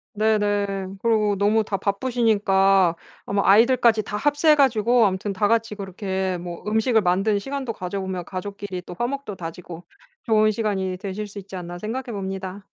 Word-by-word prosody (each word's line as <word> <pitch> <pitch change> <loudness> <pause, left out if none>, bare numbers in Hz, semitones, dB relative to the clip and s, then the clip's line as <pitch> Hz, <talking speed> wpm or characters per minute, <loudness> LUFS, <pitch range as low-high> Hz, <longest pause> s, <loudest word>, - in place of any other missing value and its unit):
네네. 205 -3 0
그리고 215 -3 +2
너무 215 +2 +3
다 205 -1 -3
바쁘시니까 200 -5 +2 0.3
아마 200 0 0
아이들까지 230 +1 +5
다 205 - -6
합세해 290 +5 +3
가지고 240 -5 +4
아무튼 190 +2 -3
다 205 +2 +1
같이 225 0 +1
그렇게 190 -2 -3
뭐 175 0 -8
음식을 220 +1 +2
만드는 195 +3 +1
시간도 265 +1 -4
가져보면 185 -1 -4
가족끼리 190 0 -6
또 175 - -9
화목도 245 -3 -3
다지고 170 0 -8 0.4
좋은 215 -2 +4
시간이 195 -4 -2
되실 200 +2 -5
수 205 0 -9
있지 195 0 -10
않나 175 -1 -7
생각해 230 +6 -4
봅니다. 190 0 -5
205 Hz, 370 characters per minute, -23 LUFS, 190-220 Hz, 0.4 s, 아이들까지